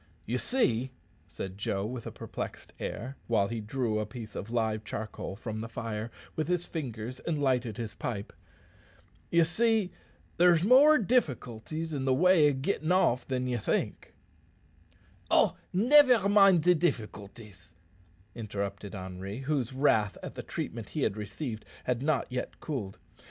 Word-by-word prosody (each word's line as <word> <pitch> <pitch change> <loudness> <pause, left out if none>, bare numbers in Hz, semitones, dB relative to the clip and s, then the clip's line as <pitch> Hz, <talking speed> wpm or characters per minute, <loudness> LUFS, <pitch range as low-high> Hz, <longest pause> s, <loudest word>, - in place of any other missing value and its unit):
"Ye 120 +4 -1
see," 130 - +1 0.4
said 95 +1 -7
Joe 100 -1 -1
with 120 +1 -5
a - - -5
perplexed - - -7
air, 130 +6 -5
while 100 -4 +2
he 115 -1 -3
drew 110 0 -1
a 105 - -1
piece 115 -4 -8
of 100 - -5
live 110 -2 0
charcoal 110 -2 -5
from 110 0 -5
the 115 - -6
fire 110 -1 -4 0.3
with 155 -1 -1
his 180 -1 +1
fingers 125 -5 -5
and 160 -3 -2
lighted 125 -6 +1
his 115 -3 -4
pipe 105 -3 -5 1.0
"ye 170 0 +5
see, 220 +3 +2 0.5
there's 175 -1 +5
more 275 +8 +7
difficulties 160 - -1
in 135 -2 -2
the 130 -1 +3
way 175 -1 +5
o' - - 0
gettin' 155 +4 -1
off 130 -10 +3
than 130 -1 -1
ye 125 -1 0
think 105 - -2 0.6
" 85 +2 -31
"Oh, - - +3 0.2
nivare 245 +1 +6
mind 195 -5 +6
de 180 +1 +6
difficulties," 105 - -4 0.6
interrupted 100 -2 -5
Henri, 95 +4 -6
whose 135 -3 -1
wrath 120 -7 +2
at - - -6
the - - -6
treatment - - -5
he - - -2
had - - +1
received 110 +3 -5 0.2
had 125 -1 -1
not 150 0 +1
yet 125 0 -4
cooled 115 -11 -4
down. - - -30
125 Hz, 155 wpm, -30 LUFS, 105-160 Hz, 1.0 s, more